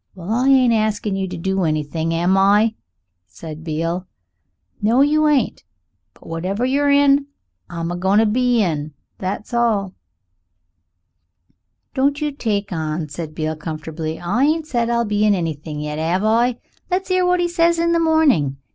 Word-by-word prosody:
"Well, 185 Hz, +2 st, -7 dB
I 250 Hz, +4 st, +2 dB
ain't 255 Hz, -3 st, +5 dB
askin' 215 Hz, -2 st, 0 dB
you 190 Hz, 0 st, -2 dB
to 180 Hz, -1 st, -6 dB
do 190 Hz, +2 st, -1 dB
anything, 155 Hz, +1 st, -1 dB
am 175 Hz, +3 st, +2 dB
I?" 205 Hz, +3 st, +4 dB, 0.5 s
said 155 Hz, -, -10 dB
Beale. 165 Hz, +3 st, -3 dB, 0.7 s
"No! 230 Hz, +5 st, +3 dB
you 305 Hz, +2 st, +3 dB
ain't. 285 Hz, -6 st, +1 dB, 0.5 s
But -, -, -20 dB
whatever 185 Hz, +8 st, -2 dB
you're 285 Hz, +2 st, +1 dB
in, 280 Hz, 0 st, +4 dB, 0.4 s
I'm 170 Hz, 0 st, -4 dB
a -, -, -3 dB
goin' 190 Hz, +3 st, +1 dB
to 225 Hz, -, +5 dB
be 240 Hz, +1 st, +2 dB
in, 155 Hz, -4 st, -3 dB, 0.2 s
that's 200 Hz, +5 st, -5 dB
all." 215 Hz, -5 st, +1 dB, 2.0 s
"Don't 280 Hz, +2 st, +1 dB
you 300 Hz, -1 st, -1 dB
take 210 Hz, -8 st, -2 dB
on," 155 Hz, -1 st, -3 dB
said 155 Hz, +1 st, -7 dB
Beale 155 Hz, -1 st, -2 dB
comfortably; 155 Hz, 0 st, -5 dB
"I 200 Hz, +9 st, 0 dB
ain't 315 Hz, +1 st, +1 dB
said 240 Hz, -6 st, -1 dB
I'll 235 Hz, 0 st, +1 dB
be 210 Hz, 0 st, 0 dB
in 210 Hz, -1 st, +4 dB
anything 155 Hz, -3 st, -4 dB
yet, 150 Hz, 0 st, -4 dB
'ave 175 Hz, +5 st, 0 dB
I? 235 Hz, +2 st, +2 dB, 0.3 s
Let's 370 Hz, +1 st, -1 dB
'ear 370 Hz, 0 st, +3 dB
what 360 Hz, 0 st, +2 dB
'e 350 Hz, -, +1 dB
says 340 Hz, -1 st, +2 dB
in 335 Hz, 0 st, +1 dB
the 335 Hz, -, +2 dB
morning. 295 Hz, -, +2 dB
205 Hz, 165 wpm, -20 LUFS, 165-265 Hz, 2.0 s, ain't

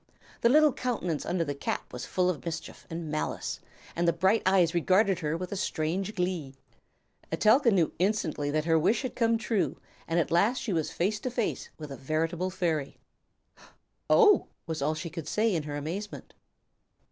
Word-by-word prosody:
The 235 Hz, -, +5 dB
little 305 Hz, +1 st, +5 dB
countenance 200 Hz, -12 st, -2 dB
under 175 Hz, -1 st, +1 dB
the 145 Hz, -3 st, -3 dB
cap 140 Hz, -, -4 dB
was 125 Hz, -, -6 dB
full 180 Hz, -1 st, +1 dB
of 180 Hz, -5 st, -1 dB
mischief 170 Hz, -2 st, -6 dB
and 165 Hz, -2 st, -5 dB
malice, 155 Hz, -, -3 dB, 0.4 s
and 170 Hz, +1 st, 0 dB
the -, -, +6 dB
bright 190 Hz, +6 st, +2 dB
eyes 185 Hz, -4 st, +4 dB
regarded 185 Hz, +2 st, +3 dB
her 155 Hz, -1 st, -1 dB
with 180 Hz, +1 st, -6 dB
a -, -, -2 dB
strange 185 Hz, +2 st, -2 dB
glee. 180 Hz, -7 st, -2 dB, 0.8 s
Etelka 235 Hz, +4 st, +4 dB
knew 180 Hz, -7 st, +2 dB
instantly 175 Hz, -7 st, 0 dB
that 155 Hz, +1 st, 0 dB
her 165 Hz, -1 st, +4 dB
wish 215 Hz, -, +2 dB
had 255 Hz, -, -4 dB
come 230 Hz, -1 st, +2 dB
true, 225 Hz, -3 st, -1 dB, 0.3 s
and 165 Hz, -, 0 dB
that -, -, +5 dB
at -, -, -14 dB
last 205 Hz, +9 st, +3 dB
she 215 Hz, -, -2 dB
was 160 Hz, -3 st, 0 dB
face 205 Hz, +5 st, 0 dB
to 255 Hz, -, -3 dB
face 235 Hz, -2 st, -2 dB
with 150 Hz, -2 st, -8 dB
a 135 Hz, -, -6 dB
veritable 165 Hz, +5 st, -1 dB
fairy. 165 Hz, -6 st, -2 dB, 1.1 s
"Oh!" 425 Hz, -4 st, +6 dB, 0.2 s
was 160 Hz, -3 st, -4 dB
all 150 Hz, +3 st, +1 dB
she 165 Hz, +1 st, -5 dB
could 165 Hz, -3 st, -6 dB
say 215 Hz, +5 st, +1 dB
in 165 Hz, -, 0 dB
her 145 Hz, -, -3 dB
amazement. 185 Hz, +8 st, -6 dB
175 Hz, 185 wpm, -28 LUFS, 160-210 Hz, 1.1 s, the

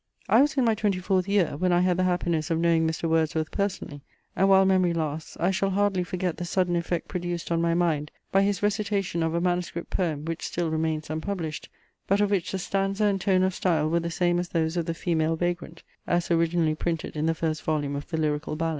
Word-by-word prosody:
I -, -, +6 dB
was 290 Hz, 0 st, +1 dB
in 260 Hz, -, +3 dB
my 225 Hz, -, +4 dB
twenty 210 Hz, -3 st, 0 dB
fourth 185 Hz, 0 st, 0 dB
year, 200 Hz, -7 st, +2 dB
when 180 Hz, +3 st, +1 dB
I 175 Hz, 0 st, +4 dB
had 180 Hz, -1 st, +2 dB
the 185 Hz, +1 st, +1 dB
happiness 175 Hz, -4 st, 0 dB
of 165 Hz, -, +1 dB
knowing 165 Hz, -1 st, +3 dB
Mr. 160 Hz, +1 st, -2 dB
Wordsworth 160 Hz, -1 st, 0 dB
personally, 190 Hz, -8 st, -3 dB, 0.3 s
and 195 Hz, +2 st, +3 dB
while 190 Hz, 0 st, +6 dB
memory 185 Hz, -2 st, +3 dB
lasts, 155 Hz, -1 st, -4 dB
I 175 Hz, +3 st, +2 dB
shall 195 Hz, +1 st, 0 dB
hardly 195 Hz, -1 st, +1 dB
forget 180 Hz, -1 st, -3 dB
the -, -, -4 dB
sudden 175 Hz, 0 st, 0 dB
effect 170 Hz, 0 st, -2 dB
produced 175 Hz, -2 st, -4 dB
on 165 Hz, 0 st, +2 dB
my 170 Hz, 0 st, +2 dB
mind, 160 Hz, -4 st, +1 dB, 0.2 s
by 195 Hz, -, +4 dB
his 200 Hz, 0 st, 0 dB
recitation 200 Hz, -4 st, 0 dB
of 165 Hz, 0 st, 0 dB
a -, -, +2 dB
manuscript 175 Hz, -1 st, -2 dB
poem, 155 Hz, -5 st, -1 dB
which 165 Hz, 0 st, -4 dB
still 170 Hz, -2 st, -2 dB
remains 155 Hz, -1 st, -1 dB
unpublished, 160 Hz, -1 st, -4 dB, 0.4 s
but 200 Hz, +1 st, +2 dB
of 205 Hz, -1 st, +2 dB
which 190 Hz, -5 st, 0 dB
the 190 Hz, -, -2 dB
stanza 195 Hz, +2 st, -1 dB
and 195 Hz, -2 st, +1 dB
tone 185 Hz, -2 st, +3 dB
of 190 Hz, 0 st, +1 dB
style 160 Hz, -4 st, +1 dB
were 170 Hz, -, +3 dB
the 170 Hz, 0 st, -3 dB
same 175 Hz, +1 st, +1 dB
as 175 Hz, 0 st, -3 dB
those 160 Hz, -1 st, 0 dB
of 170 Hz, -2 st, -1 dB
The 165 Hz, -, -2 dB
Female 165 Hz, -2 st, 0 dB
Vagrant, 175 Hz, 0 st, -3 dB, 0.2 s
as 175 Hz, 0 st, 0 dB
originally 165 Hz, -1 st, +2 dB
printed 165 Hz, +1 st, -3 dB
in 155 Hz, +1 st, 0 dB
the 165 Hz, -, +1 dB
first 155 Hz, -1 st, -2 dB
volume 145 Hz, -2 st, -1 dB
of 140 Hz, -, -5 dB
the 165 Hz, -, -3 dB
Lyrical 150 Hz, -1 st, -1 dB
Ballads. 165 Hz, +1 st, -1 dB
175 Hz, 230 wpm, -26 LUFS, 160-190 Hz, 0.4 s, I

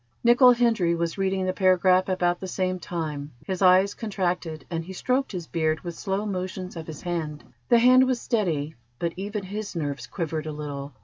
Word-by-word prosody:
Nicol 245 Hz, +1 st, +7 dB
Hendry 225 Hz, -8 st, +2 dB
was 170 Hz, +2 st, -2 dB
reading 190 Hz, -1 st, 0 dB
the 185 Hz, -, 0 dB
paragraph 185 Hz, 0 st, +3 dB
about 175 Hz, -1 st, +1 dB
the 190 Hz, -, -6 dB
same 185 Hz, 0 st, -1 dB
time. 155 Hz, -5 st, -5 dB
His 190 Hz, -1 st, -3 dB
eyes 190 Hz, +2 st, +5 dB
contracted, 180 Hz, -7 st, -3 dB
and 165 Hz, -1 st, -2 dB
he 185 Hz, +3 st, -8 dB
stroked 255 Hz, +8 st, 0 dB
his 180 Hz, -4 st, -5 dB
beard 160 Hz, -1 st, -1 dB
with 175 Hz, -2 st, -5 dB
slow 195 Hz, +4 st, -2 dB
motions 185 Hz, -2 st, -4 dB
of 160 Hz, -1 st, -7 dB
his 155 Hz, -3 st, -8 dB
hand. 160 Hz, -4 st, -3 dB, 0.3 s
The 240 Hz, -, +6 dB
hand 255 Hz, +2 st, +6 dB
was 255 Hz, -2 st, 0 dB
steady, 165 Hz, -, -1 dB, 0.2 s
but 170 Hz, +3 st, -2 dB
even 200 Hz, +2 st, -4 dB
his 205 Hz, +1 st, -6 dB
nerves 140 Hz, -7 st, -3 dB
quivered 155 Hz, +3 st, -3 dB
a -, -, -3 dB
little. 145 Hz, -1 st, -6 dB
185 Hz, 190 wpm, -25 LUFS, 165-200 Hz, 0.3 s, Nicol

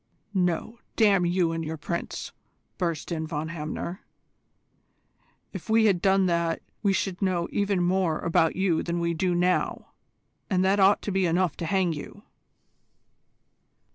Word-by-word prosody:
"No, 185 Hz, +5 st, -1 dB, 0.2 s
damn 200 Hz, -5 st, +4 dB
you 175 Hz, -1 st, +1 dB
and 165 Hz, 0 st, -3 dB
your 160 Hz, 0 st, -4 dB
Prince!" 170 Hz, +3 st, -4 dB, 0.5 s
burst 170 Hz, -3 st, -2 dB
in 160 Hz, -1 st, -2 dB
Von 155 Hz, 0 st, -3 dB
Hamner. 170 Hz, +3 st, -5 dB, 1.5 s
"If -, -, -8 dB
we 220 Hz, 0 st, +4 dB
had 190 Hz, -5 st, +3 dB
done 195 Hz, 0 st, +3 dB
that 170 Hz, -2 st, 0 dB, 0.2 s
we 200 Hz, -, +2 dB
should 190 Hz, -1 st, -2 dB
know 180 Hz, -3 st, 0 dB
even 200 Hz, -3 st, +1 dB
more 180 Hz, -3 st, +1 dB
about 165 Hz, -1 st, +1 dB
you 185 Hz, -4 st, +1 dB
than 170 Hz, 0 st, -2 dB
we 170 Hz, 0 st, 0 dB
do 175 Hz, +1 st, 0 dB
now 180 Hz, +1 st, 0 dB, 0.6 s
and 185 Hz, -1 st, +2 dB
that 195 Hz, +2 st, +3 dB
ought 195 Hz, +1 st, +4 dB
to 205 Hz, -, -3 dB
be 190 Hz, -1 st, +2 dB
enough 175 Hz, 0 st, +1 dB
to 165 Hz, -, -4 dB
hang 185 Hz, -1 st, +1 dB
you." 160 Hz, +7 st, -9 dB
180 Hz, 150 wpm, -26 LUFS, 170-195 Hz, 1.5 s, damn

